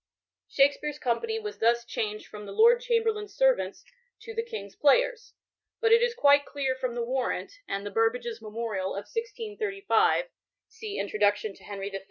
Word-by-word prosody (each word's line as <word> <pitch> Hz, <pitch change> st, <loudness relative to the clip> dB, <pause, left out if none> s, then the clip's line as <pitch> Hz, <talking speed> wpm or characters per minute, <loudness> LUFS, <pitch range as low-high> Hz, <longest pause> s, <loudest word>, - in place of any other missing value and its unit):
Shakspere*s 285 Hz, +1 st, +2 dB
company 445 Hz, -, -1 dB
was 425 Hz, -1 st, -6 dB
thus 235 Hz, +1 st, +2 dB
changed 215 Hz, -3 st, -3 dB
from 210 Hz, -1 st, -10 dB
The -, -, -7 dB
Lord 470 Hz, +3 st, +5 dB
Chamberlain's 450 Hz, -4 st, 0 dB
Servants" -, -, +1 dB, 0.4 s
to 455 Hz, +1 st, -8 dB
•*The 455 Hz, -, -1 dB
King's 200 Hz, -, -8 dB
Players," 485 Hz, -, +2 dB, 0.4 s
But 450 Hz, -1 st, +2 dB
it 460 Hz, +1 st, +7 dB
is 480 Hz, -1 st, +1 dB
quite 285 Hz, -9 st, +5 dB
clear 280 Hz, -2 st, -2 dB
from 255 Hz, -2 st, -4 dB
the 240 Hz, -, -1 dB
Warrant, 260 Hz, -, -2 dB
and 200 Hz, +1 st, -3 dB
the 205 Hz, -, -4 dB
Burbages' 225 Hz, +1 st, 0 dB
Memorial 215 Hz, -3 st, -3 dB
of 200 Hz, +1 st, -5 dB
1635 440 Hz, +1 st, 0 dB, 0.4 s
{see 445 Hz, -2 st, -7 dB
Introduction 205 Hz, 0 st, +1 dB
to -, -, -19 dB
Henry 200 Hz, -1 st, -5 dB
F. 195 Hz, -, -3 dB
285 Hz, 165 wpm, -28 LUFS, -, 0.4 s, it